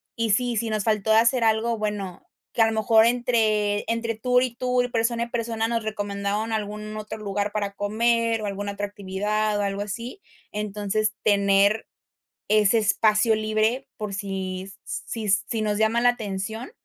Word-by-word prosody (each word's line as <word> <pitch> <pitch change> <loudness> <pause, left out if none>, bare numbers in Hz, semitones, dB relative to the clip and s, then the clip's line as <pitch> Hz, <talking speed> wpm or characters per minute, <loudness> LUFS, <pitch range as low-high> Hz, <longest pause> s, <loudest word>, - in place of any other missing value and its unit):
Y 230 -1 -1
sí, 240 +3 +2
si 225 +1 -1
nos 215 -1 -1
faltó 220 -1 +1
hacer 230 +3 +4
algo, 225 +1 +2
bueno, 205 -4 -4 0.3
que 230 - +1
a 225 - +6
lo - - 0
mejor 220 0 +4
entre 220 -4 +2
entre 230 0 -1
tour 250 +3 +2
y 250 -2 -3
tour, 250 0 0
persona 235 0 0
y - - -4
persona, 230 -2 -1
nos 230 -1 -1
recomendaron 205 +1 -2
algún 210 0 -4
otro 215 0 -6
lugar 205 -1 -2
para 205 -2 -2
comer, 230 +2 +1
o - - -3
alguna 200 0 -3
otra 205 0 -3
actividad, 205 +2 -1
o - - +1
algo 200 0 -2
así. 230 - -6 0.3
Entonces, 210 0 -1
tener 200 +1 +3 0.6
ese 215 +1 +4
espacio 215 +1 +3
libre 215 +4 0
por 210 -2 -5
si 190 -1 -4
si 220 -3 -4
si 215 +3 0
nos 210 -1 0
llama 220 +2 +2
la 245 - +6
atención, 220 - -5
215 Hz, 165 wpm, -24 LUFS, 205-230 Hz, 0.6 s, a